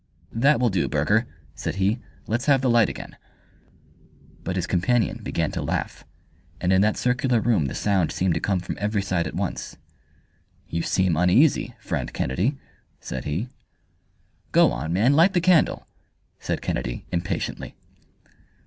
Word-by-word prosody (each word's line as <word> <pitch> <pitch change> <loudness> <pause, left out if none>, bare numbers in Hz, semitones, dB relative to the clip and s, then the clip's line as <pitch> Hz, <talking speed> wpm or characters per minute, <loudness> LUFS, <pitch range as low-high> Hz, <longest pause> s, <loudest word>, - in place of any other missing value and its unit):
"That 140 +6 +3
will 125 -3 +2
do, 95 -3 +1
Burger," 100 +11 +1 0.3
said 80 +2 -4
he, 100 +5 +1 0.3
"let's 120 +6 -2
have 135 -3 +4
the 130 - +1
light 115 -3 +4
again." - - -9 1.3
But 90 - -3
his 90 - -1
companion 100 +4 +1
began - - -2
to - - -3
laugh, - - -3 0.5
and 90 +1 +1
in 95 - +4
that 105 +1 +2
circular 125 -1 +1
room 110 -10 +2
the - - -5
sound 95 -5 +1
seemed 90 -2 0
to - - -1
come 95 -2 0
from 90 - -5
every 105 -1 0
side 90 -3 -1
at - - -7
once. - - -4 0.9
"You 85 - -2
seem 95 -1 +1
uneasy, 115 - +3
friend 75 - -3
Kennedy," 100 - -1 0.4
said - - -6
he. 85 - -2 1.0
"Go - - +5
on, 65 +6 -4
man, 110 +10 +3
light 170 +7 +5
the 180 - +3
candle!" 175 -2 +3 0.5
said - - -3
Kennedy, - - -3
impatiently. 85 0 -3
100 Hz, 155 wpm, -24 LUFS, 85-125 Hz, 1.3 s, Go